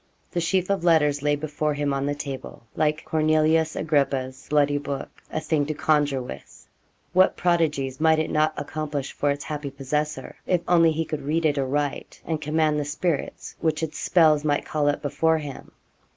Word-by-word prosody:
The 175 - -1
sheaf 185 +2 +1
of 195 -3 0
letters 150 -4 +3
lay 145 0 +2
before 150 0 -2
him 145 -1 0
on 135 0 -1
the 145 - -1
table, 140 -4 -7
like 155 0 0
Cornelius 155 0 +2
Agrippa's 135 -4 -1
'bloody 145 -1 +3
book' 140 -1 -6
a - - -1
thing 155 -2 0
to 155 - -2
conjure 145 -4 +1
with. 70 - -11 0.5
What 185 +1 +4
prodigies 150 -6 0
might 160 0 +5
it 155 - -1
not 155 0 +2
accomplish 150 -3 -4
for 145 - -1
its 140 0 -1
happy 150 -2 -4
possessor, 140 +1 -3
if 180 -2 +2
only 165 -2 +5
he 160 +1 -1
could 155 -1 -4
read 160 +4 0
it 145 -2 +2
aright, 140 +1 -2
and 160 -2 -2
command 155 0 +1
the - - -1
spirits 155 +1 -3
which 160 -1 0
its 155 - -4
spells 155 -4 +4
might 145 -1 0
call 150 -1 +1
up 145 - -2
before 160 +3 +2
him? 145 -3 -8
150 Hz, 180 wpm, -24 LUFS, 145-160 Hz, 0.5 s, might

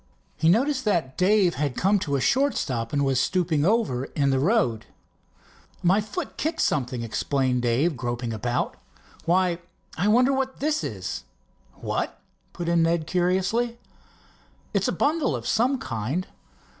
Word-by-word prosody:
He 160 - +2
noticed 260 - +2
that 165 -11 0
Dave 185 -1 +3
had 140 -2 -2
come 200 +3 +3
to 145 -6 -1
a - - +1
short 275 - +2
stop 115 -4 -2
and 140 -1 +1
was 135 -2 +2
stooping 160 -1 +1
over 185 - +1
in 140 -1 0
the 135 - +2
road. 145 - +1 1.0
"My 190 +4 +4
foot 210 0 -6
kicked 320 +2 -2
something," 125 -4 0
explained 125 +2 0
Dave, 130 +7 +1
groping 120 -1 -3
about. 120 +3 -2 0.5
"Why, 175 0 +2 0.4
I 190 - +2
wonder 250 +5 +4
what 265 0 -2
this 305 +2 0
is?" 95 -3 -4 0.5
"What?" - - -3 0.3
put 175 -1 -5
in 170 0 +3
Ned 165 -1 +1
curiously. 190 +8 0 1.0
"It's - - +1
a - - +1
bundle 300 - +1
of 120 -1 -6
some 250 +5 +2
kind." 130 - -3
170 Hz, 150 wpm, -25 LUFS, 130-215 Hz, 1.0 s, My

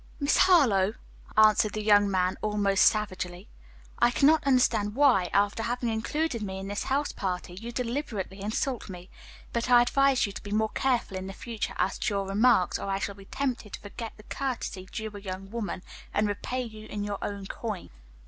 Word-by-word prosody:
"Miss 285 0 +2
Harlowe," 225 - +5 0.4
answered 215 -1 +5
the 215 - -3
young 205 -1 +5
man 185 -1 +1
almost 205 -2 +2
savagely, 185 -2 0 0.5
"I 240 - +5
cannot 290 +4 +3
understand 225 -5 +2
why, 250 -11 +4
after 205 +2 +2
having 240 +1 -1
included 235 +4 -1
me 190 -2 -4
in 195 0 -6
this 205 - -3
house 280 +2 0
party, 180 -2 -4
you 225 +6 -7
deliberately 230 -6 -3
insult 220 +4 -2
me; 180 0 -10 0.4
but 235 +1 -1
I 240 -1 +7
advise 275 +1 +3
you 200 - -5
to - - -8
be 205 - -9
more 220 +1 +1
careful 245 -7 0
in 185 0 -5
the 195 - -6
future 230 +2 -5
as 190 - 0
to 205 - -1
your 195 -1 -1
remarks 210 -1 +3
or - - -5
I 195 - 0
shall 200 +1 -3
be 195 0 -14
tempted 250 -4 -3
to - - -5
forget 220 +2 -7
the 215 - -14
courtesy 235 -8 -4
due 220 0 -4
a 205 - -8
young 195 0 -7
woman, 220 -5 -4 0.3
and 210 0 +2
repay 250 +5 -3
you 215 -2 -9
in 205 -1 -4
your 205 -1 -3
own 200 -1 -4
coin." 210 -2 -5
215 Hz, 195 wpm, -28 LUFS, 195-240 Hz, 0.5 s, I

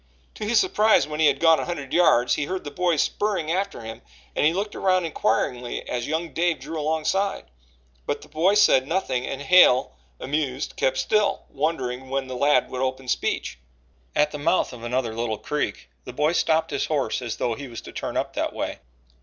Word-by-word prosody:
To 215 - -6
his 220 +1 +3
surprise, 215 -4 +3
when 150 0 -5
he 160 - +5
had 140 -1 +2
gone 165 -1 +5
a - - -2
hundred 145 -6 -5
yards, 125 -8 +4
he 145 - 0
heard 185 +4 -4
the 145 - -7
boy 180 0 +1
spurring 180 +1 0
after 195 -4 -2
him 110 0 -8 0.3
and - - +1
he - - +3
looked 200 +4 -3
around 185 -2 +2
inquiringly 120 -4 -1
as 120 -1 -3
young 160 +2 -2
Dave 170 -1 +1
drew 160 -1 -6
alongside; 160 - -1 0.6
but - - -2
the - - -14
boy 180 +6 +2
said 170 -11 +5
nothing 135 -8 -1
and 135 +1 -5
Hale, 160 -8 +5 0.2
amused, 140 -2 -2
kept 130 0 0
still, 210 +6 +1
wondering 130 -4 -2
when 135 0 -1
the 130 -1 -6
lad 140 0 +2
would 130 - -3
open 130 0 -2
speech. 65 - -2 0.6
At 150 0 +3
the 150 - -6
mouth 165 -1 +1
of 120 -2 -10
another 120 -1 -1
little 115 -1 -2
creek 150 +5 -3 0.2
the 125 - -8
boy 150 +5 +1
stopped 160 -1 +1
his 140 -1 -1
horse 145 -4 -1
as 120 -3 -4
though 120 - 0
he 140 +4 -7
was 115 -2 -8
to - - -11
turn - - -4
up - - -2
that - - -2
way. - - -4
150 Hz, 205 wpm, -24 LUFS, 130-170 Hz, 0.6 s, he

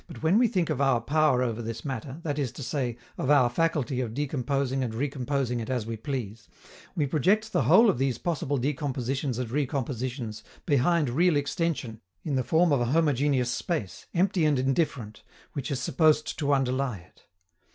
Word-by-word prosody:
But 165 - -11
when 175 +7 +4
we 245 - +5
think 180 -7 0
of 140 -2 -1
our 135 -3 +3
power 140 0 +2
over 120 -2 -2
this 115 +2 -6
matter, 135 +2 -5
that 150 -2 -2
is 135 -5 -1
to 140 - -7
say, 125 -3 -2 0.2
of 130 - -1
our 130 -5 +5
faculty 140 -3 0
of 115 -3 -4
decomposing 135 -1 -1
and 115 -3 -4
recomposing 135 -1 -1
it 115 - -5
as 125 -4 -1
we 115 0 -4
please, 110 -3 -5 0.5
we 150 - +1
project 190 +10 +1
the - - +2
whole 230 - +7
of 160 - +2
these 135 -3 0
possible 145 -4 -1
decompositions 135 -1 -2
and 125 -3 -3
recompositions 130 -4 -3 0.2
behind 150 +2 +2
real 170 +5 +3
extension 145 - -2 0.2
in 150 - -3
the 130 -1 +1
form 160 +7 +3
of 140 -4 +3
a - - +2
homogeneous 140 -3 +2
space, 125 - -3
empty 180 -1 +2
and 150 -2 +3
indifferent, 130 -5 -1 0.3
which 135 -4 -4
is 135 - -2
supposed 155 +3 +2
to 145 -2 +1
underlie 135 -3 0
it. 90 +1 -20
135 Hz, 185 wpm, -27 LUFS, 125-150 Hz, 0.5 s, whole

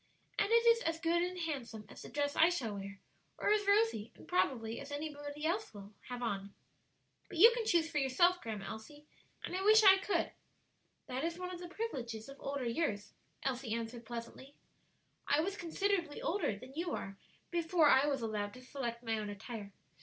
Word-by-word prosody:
And - - +2
it 465 +1 +5
is 465 0 +6
as 325 -4 -1
good 340 +1 +2
and 360 +1 -2
handsome 265 -10 -4
as - - -12
the - - -9
dress 285 0 -1
I 325 - +6
shall 250 -12 -2
wear 200 0 -7 0.4
or - - +1
as 415 -1 +2
Rosie, 405 - +3
and - - -15
probably 235 -11 0
any 290 +2 -5
one 290 - -10 0.2
else, 375 +7 0
will 200 +1 -10 0.2
have 245 0 -4
on." 200 -3 -3 0.7
"But - - -7
you 450 +8 +10
can 465 -2 -2
choose 335 -5 +3
for 310 -2 -1
yourself, 345 +7 +3
Grandma 215 -4 -5
Elsie, 290 +7 -9 0.4
and - - -4
I 375 - -1
wish 435 +2 +7
I 385 -1 +9
could." 395 +1 0 0.7
"That 255 +3 -3
is 335 +1 -2
one 365 0 -5
of 350 - -7
the 350 - -7
privileges 240 - -4
of 275 - -10
older 275 -2 -3
years," 230 -6 -1 0.3
Elsie 250 -4 -1
answered 230 +1 -5
pleasantly. 240 +4 -7 0.7
"I 290 - +4
was 385 +4 -2
considerably 350 -3 -1
older 340 - 0
than 255 +5 -12
you 340 +4 -2
are 195 0 -6 0.3
before 335 -2 +3
I 275 +1 +6
was 275 -4 0
allowed 210 -1 -2
to 255 - -12
select 240 -3 -4
my 225 -2 0
own 210 -1 -4
attire. 205 0 -7
285 Hz, 195 wpm, -34 LUFS, 230-355 Hz, 0.7 s, you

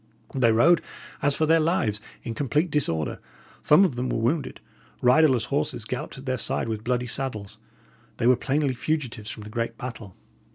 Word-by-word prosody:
They 125 -4 +3
rode 150 +10 +5 0.4
as 145 0 +2
for 155 - +1
their 165 +1 +4
lives, 155 - 0 0.2
in 115 - -4
complete 150 +7 0
disorder; 80 - 0 0.4
some 170 +7 +6
of 155 -10 -1
them 125 +1 -2
were - - -1
wounded; 135 +7 -1 0.4
riderless 125 -1 +4
horses 140 -5 -2
galloped 125 +3 -5
at 135 - -10
their 130 -2 -1
side - - -1
with 110 -1 -4
bloody 125 +1 0
saddles. 120 -5 -4 0.6
They - - -1
were 125 +1 +6
plainly 140 +2 0
fugitives 125 -5 -3
from 110 - -7
the 105 - -10
great 115 0 -3
battle. 115 -6 -8
125 Hz, 175 wpm, -25 LUFS, 115-150 Hz, 0.6 s, some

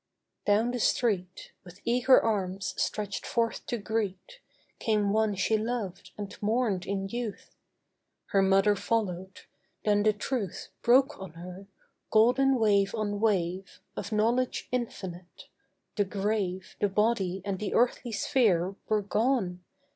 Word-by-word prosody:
Down 215 +4 +3
the 245 - -3
street, 195 -7 0
With 180 0 -14
eager 250 +2 +5
arms 195 -4 -1
stretched 205 -2 -2
forth 230 -1 -1
to 240 - -1
greet, 220 - -3 0.4
Came 210 -2 +1
one 220 -1 +2
she 215 +3 +1
loved 220 -4 -4
and 205 -1 -6
mourned 215 -4 0
in 195 0 -2
youth; 235 0 -6 0.7
Her 195 - +3
mother 195 +2 +4
followed; 190 -3 -2 0.4
then 205 -1 +3
the 215 +1 +4
truth 210 -2 -4
Broke 265 +4 +4
on 190 -4 -8
her, 180 +3 -10 0.4
golden 255 +5 +4
wave 200 -2 +3
on 205 -2 -2
wave, 190 -3 0 0.2
Of - - -5
knowledge 235 +4 +1
infinite. 190 -8 -5 0.5
The 205 - +2
grave, 195 -2 -2
The 205 - +3
body 195 -3 +1
and 195 -2 -2
the 210 - -3
earthly 240 0 +2
sphere 200 -5 +2 0.2
Were 215 -1 +2
gone! 205 -4 0
210 Hz, 130 wpm, -29 LUFS, 190-230 Hz, 0.7 s, eager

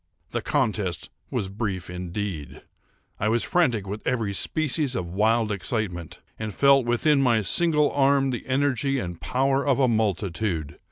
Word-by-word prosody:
The - - -2
contest 95 -7 -1 0.2
was 95 - -2
brief 100 -3 -4
indeed. 90 -3 -5 0.6
I 105 - +1
was 115 +1 +2
frantic 125 - +1
with 105 +2 -5
every 115 -5 0
species 145 - 0
of 90 -4 -2
wild 110 +2 +2
excitement, 95 -4 -4 0.2
and 110 -3 -5
felt 135 -3 +4
within 140 +4 +3
my 120 -4 +3
single 150 - +3
arm 135 -1 +3
the 120 - -5
energy 135 0 +1
and 90 -8 -5
power 135 - +1
of 140 -3 +2
a 130 - +4
multitude. 100 -7 -1
110 Hz, 150 wpm, -25 LUFS, 95-135 Hz, 0.6 s, felt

